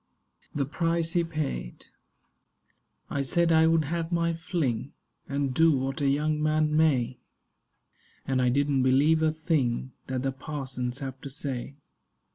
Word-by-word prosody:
THE 140 Hz, -2 st, +1 dB
PRICE 165 Hz, +3 st, -1 dB
HE 170 Hz, -2 st, +2 dB
PAID 145 Hz, -, -4 dB, 1.3 s
I 140 Hz, -, 0 dB
SAID 170 Hz, +5 st, +2 dB
I 160 Hz, 0 st, +5 dB
would 165 Hz, -1 st, +3 dB
have 165 Hz, +2 st, -3 dB
my 170 Hz, -1 st, +1 dB
fling, 160 Hz, -7 st, -2 dB, 0.4 s
And 140 Hz, -1 st, -1 dB
do 160 Hz, +1 st, +4 dB
what 135 Hz, +3 st, -3 dB
a 140 Hz, -, +2 dB
young 150 Hz, +2 st, +1 dB
man 155 Hz, 0 st, +2 dB
may; 130 Hz, -6 st, +2 dB, 1.1 s
And 130 Hz, -1 st, +1 dB
I 125 Hz, -, +3 dB
didn't 140 Hz, +1 st, +2 dB
believe 140 Hz, +5 st, +4 dB
a 160 Hz, -1 st, +3 dB
thing 145 Hz, -6 st, -1 dB, 0.2 s
That 130 Hz, -1 st, -2 dB
the 135 Hz, -, 0 dB
parsons 130 Hz, -3 st, -4 dB
have 135 Hz, -1 st, -6 dB
to 140 Hz, -, -7 dB
say. 135 Hz, -1 st, -5 dB
145 Hz, 145 wpm, -27 LUFS, 130-160 Hz, 1.3 s, I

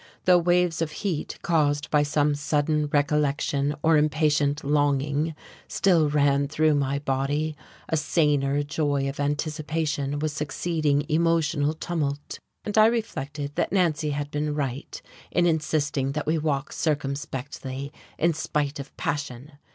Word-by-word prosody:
Though 180 Hz, -1 st, +6 dB
waves 175 Hz, -1 st, +2 dB
of 155 Hz, -2 st, -1 dB
heat 170 Hz, -6 st, -2 dB
caused 145 Hz, -4 st, +1 dB
by 150 Hz, -, +4 dB
some 145 Hz, 0 st, +2 dB
sudden 150 Hz, +1 st, 0 dB
recollection 145 Hz, 0 st, +1 dB
or 160 Hz, -1 st, +5 dB
impatient 150 Hz, -1 st, +2 dB
longing 145 Hz, +2 st, +1 dB, 0.3 s
still 170 Hz, -6 st, +3 dB
ran 140 Hz, -1 st, +2 dB
through 155 Hz, +1 st, +2 dB
my 140 Hz, -1 st, 0 dB
body, 145 Hz, +3 st, -1 dB, 0.3 s
a -, -, 0 dB
saner 145 Hz, -3 st, +1 dB
joy 145 Hz, -2 st, 0 dB
of 135 Hz, +1 st, -5 dB
anticipation 150 Hz, 0 st, -1 dB
was 150 Hz, 0 st, -2 dB
succeeding 150 Hz, -1 st, 0 dB
emotional 160 Hz, -2 st, +1 dB
tumult, 150 Hz, -4 st, -3 dB, 0.3 s
and 210 Hz, -, -3 dB
I 215 Hz, -, +8 dB
reflected 145 Hz, -, -3 dB
that -, -, 0 dB
Nancy 165 Hz, -5 st, +1 dB
had 145 Hz, 0 st, -3 dB
been 150 Hz, 0 st, -1 dB
right 140 Hz, -1 st, -4 dB, 0.3 s
in 175 Hz, -, +2 dB
insisting 150 Hz, -4 st, 0 dB
that 150 Hz, 0 st, -3 dB
we 160 Hz, +1 st, +1 dB
walk 145 Hz, -2 st, -1 dB
circumspectly 140 Hz, -2 st, -3 dB, 0.2 s
in 170 Hz, +1 st, +2 dB
spite 150 Hz, -2 st, -2 dB
of 140 Hz, +1 st, -9 dB
passion. 140 Hz, 0 st, -4 dB
150 Hz, 135 wpm, -25 LUFS, 145-155 Hz, 0.3 s, I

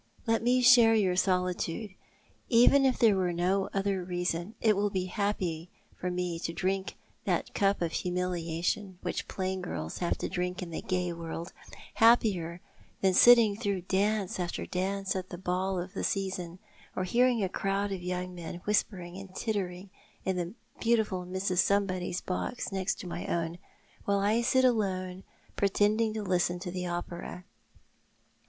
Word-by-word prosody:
Let 225 Hz, -1 st, +2 dB
me 250 Hz, +2 st, +3 dB
share 240 Hz, -3 st, +7 dB
your 190 Hz, -4 st, +2 dB
solitude. 180 Hz, +1 st, 0 dB, 0.6 s
Even 250 Hz, +3 st, +6 dB
if 260 Hz, -2 st, +3 dB
there 220 Hz, -4 st, +5 dB
were 185 Hz, -2 st, +1 dB
no 185 Hz, +3 st, 0 dB
other 195 Hz, -1 st, 0 dB
reason 175 Hz, +2 st, -2 dB
— -, -, -39 dB
it 215 Hz, -2 st, +3 dB
will 205 Hz, +1 st, +1 dB
be 185 Hz, -2 st, -2 dB
happier 185 Hz, -4 st, -2 dB, 0.3 s
for 180 Hz, -, -3 dB
me 180 Hz, -1 st, -2 dB
than -, -, -5 dB
to 165 Hz, -, -2 dB
drink 190 Hz, +3 st, -1 dB, 0.3 s
that -, -, -1 dB
cup 200 Hz, -3 st, +2 dB
of 165 Hz, -, -1 dB
humiliation 180 Hz, +1 st, -2 dB
which -, -, -3 dB
plain 190 Hz, 0 st, -3 dB
girls 80 Hz, -, -5 dB
have 175 Hz, -, 0 dB
to -, -, -3 dB
drink 180 Hz, 0 st, -3 dB
in 170 Hz, -, -8 dB
the 160 Hz, -, -4 dB
gay 180 Hz, -2 st, -1 dB
world 165 Hz, 0 st, -6 dB, 0.2 s
— -, -, -17 dB
happier 185 Hz, -7 st, +3 dB, 0.4 s
than 190 Hz, -1 st, +3 dB
sitting 230 Hz, 0 st, +7 dB
through 200 Hz, -4 st, -2 dB
dance 195 Hz, +1 st, 0 dB
after 175 Hz, -1 st, -3 dB
dance 195 Hz, +1 st, -2 dB
at 185 Hz, -1 st, -4 dB
the 175 Hz, -, -6 dB
ball 185 Hz, +1 st, -1 dB
of 180 Hz, +2 st, -6 dB
the -, -, -4 dB
season 185 Hz, -3 st, -2 dB, 0.2 s
— -, -, -26 dB
or 185 Hz, -, -1 dB
hearing 240 Hz, +3 st, +3 dB
a -, -, +2 dB
crowd 195 Hz, +2 st, -1 dB
of 190 Hz, -2 st, -3 dB
young 180 Hz, 0 st, -3 dB
men 170 Hz, -1 st, -7 dB
whispering 185 Hz, -4 st, -1 dB
and 195 Hz, -1 st, -11 dB
tittering 190 Hz, -3 st, -3 dB, 0.3 s
in 190 Hz, -, 0 dB
the 175 Hz, +3 st, -3 dB, 0.2 s
beautiful 215 Hz, -6 st, +1 dB
Mrs. 185 Hz, 0 st, -1 dB
Somebody's 185 Hz, -2 st, +1 dB
box 195 Hz, +6 st, -3 dB
next 190 Hz, -1 st, -2 dB
my 175 Hz, 0 st, -5 dB
own, 170 Hz, 0 st, -2 dB, 0.5 s
while 200 Hz, 0 st, +2 dB
I 210 Hz, +4 st, +2 dB
sit 260 Hz, +2 st, +3 dB
alone, 190 Hz, -6 st, 0 dB, 0.3 s
pretending 210 Hz, +3 st, +2 dB
to 215 Hz, -, -2 dB
listen 180 Hz, -2 st, +1 dB
to 180 Hz, -2 st, -4 dB
the 180 Hz, 0 st, -3 dB
opera. 175 Hz, +1 st, -5 dB
185 Hz, 170 wpm, -30 LUFS, 180-205 Hz, 0.6 s, share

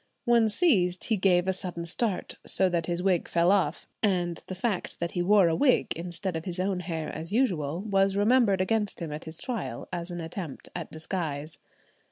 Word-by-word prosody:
When 235 Hz, -2 st, +4 dB
seized 195 Hz, -, +2 dB
he 225 Hz, -, +1 dB
gave 185 Hz, -1 st, +3 dB
a 190 Hz, -, +2 dB
sudden 175 Hz, -2 st, -4 dB
start, 190 Hz, +2 st, -1 dB
so 190 Hz, -1 st, +2 dB
that 170 Hz, -2 st, -1 dB
his 175 Hz, 0 st, -1 dB
wig 185 Hz, -3 st, +2 dB
fell 170 Hz, +2 st, +3 dB
off, 180 Hz, -6 st, +1 dB
and 175 Hz, -5 st, 0 dB
the 185 Hz, -, -5 dB
fact 195 Hz, 0 st, -2 dB
that 170 Hz, 0 st, -2 dB
he 175 Hz, -, -1 dB
wore 195 Hz, 0 st, +5 dB
a 165 Hz, -, +2 dB
wig, 270 Hz, -, +3 dB
instead 175 Hz, +2 st, -4 dB
of 160 Hz, -, -4 dB
his 180 Hz, -1 st, -4 dB
own 190 Hz, 0 st, 0 dB
hair 165 Hz, -3 st, -4 dB
as 160 Hz, +3 st, -6 dB
usual, 180 Hz, -, +1 dB
was 195 Hz, -2 st, +2 dB
remembered 210 Hz, -2 st, +4 dB
against 210 Hz, +1 st, 0 dB
him 165 Hz, -3 st, -5 dB
at 150 Hz, +2 st, -6 dB
his 160 Hz, 0 st, -8 dB
trial, 135 Hz, -, -4 dB
as 170 Hz, 0 st, -4 dB
an 175 Hz, -1 st, -5 dB
attempt 165 Hz, -2 st, -6 dB
at 175 Hz, -2 st, -5 dB
disguise. 155 Hz, -2 st, -4 dB
180 Hz, 200 wpm, -28 LUFS, 170-200 Hz, -, wore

